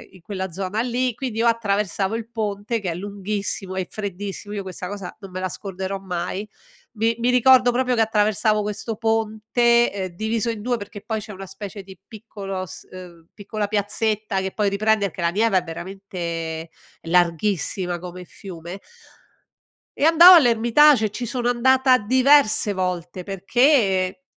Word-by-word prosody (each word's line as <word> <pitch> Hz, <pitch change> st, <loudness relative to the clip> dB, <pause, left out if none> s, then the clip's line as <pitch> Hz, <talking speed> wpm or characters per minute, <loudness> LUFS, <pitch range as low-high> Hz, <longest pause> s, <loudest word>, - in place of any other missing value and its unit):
in 185 Hz, -, -16 dB
quella 190 Hz, -1 st, -5 dB
zona 195 Hz, +4 st, -3 dB
lì, 250 Hz, +1 st, -1 dB
quindi 230 Hz, -1 st, -5 dB
io 230 Hz, -, +2 dB
attraversavo 210 Hz, -3 st, 0 dB
il 230 Hz, -1 st, -5 dB
ponte 215 Hz, 0 st, -2 dB
che 195 Hz, -4 st, -4 dB
è -, -, -5 dB
lunghissimo, 200 Hz, 0 st, -4 dB
e 190 Hz, -2 st, -3 dB
freddissimo, 205 Hz, 0 st, -6 dB
io 205 Hz, -, -3 dB
questa 185 Hz, -1 st, -7 dB
cosa 200 Hz, -1 st, -7 dB
non 195 Hz, -3 st, -11 dB
me 185 Hz, -, -5 dB
la 185 Hz, 0 st, -2 dB
scorderò 190 Hz, 0 st, -5 dB
mai. 185 Hz, +2 st, -4 dB, 0.5 s
Mi 225 Hz, +1 st, 0 dB
mi 240 Hz, +1 st, +1 dB
ricordo 250 Hz, 0 st, +5 dB
proprio 250 Hz, +1 st, 0 dB
che 225 Hz, -, +2 dB
attraversavo 215 Hz, -1 st, +2 dB
questo 210 Hz, +2 st, -4 dB
ponte, 225 Hz, +2 st, +2 dB
ehm, 195 Hz, -2 st, -4 dB
diviso 220 Hz, +3 st, -1 dB
in 225 Hz, -2 st, -4 dB
2 245 Hz, +2 st, -1 dB
perché 205 Hz, -1 st, -9 dB
poi 220 Hz, 0 st, -3 dB
c'è 210 Hz, 0 st, -9 dB
una 195 Hz, +1 st, -8 dB
specie 195 Hz, +2 st, -8 dB
di 190 Hz, -1 st, -13 dB
piccolo 200 Hz, -4 st, -7 dB
s 170 Hz, -, -10 dB
uhm, 175 Hz, -3 st, -12 dB
piccola 205 Hz, 0 st, -4 dB
piazzetta 210 Hz, 0 st, -1 dB
che 190 Hz, 0 st, -3 dB
poi 210 Hz, -2 st, +1 dB
riprende, 215 Hz, +1 st, +1 dB
perché 175 Hz, -, -8 dB
la 170 Hz, -, +2 dB
Neva 210 Hz, +1 st, +2 dB
è 180 Hz, -, +1 dB
veramente 170 Hz, -2 st, -6 dB, 0.3 s
larghissima 175 Hz, +1 st, 0 dB
come 180 Hz, +1 st, -8 dB
fiume 175 Hz, 0 st, -9 dB, 1.2 s
e -, -, -2 dB
andavo 335 Hz, +3 st, +9 dB
all'Hermitage, 240 Hz, -2 st, +5 dB
ci 240 Hz, +4 st, -5 dB
sono 240 Hz, 0 st, -2 dB
andata 260 Hz, +2 st, +4 dB
diverse 255 Hz, -1 st, +3 dB
volte 180 Hz, -1 st, -3 dB
perché 195 Hz, -, +1 dB
205 Hz, 160 wpm, -22 LUFS, 190-230 Hz, 1.2 s, andavo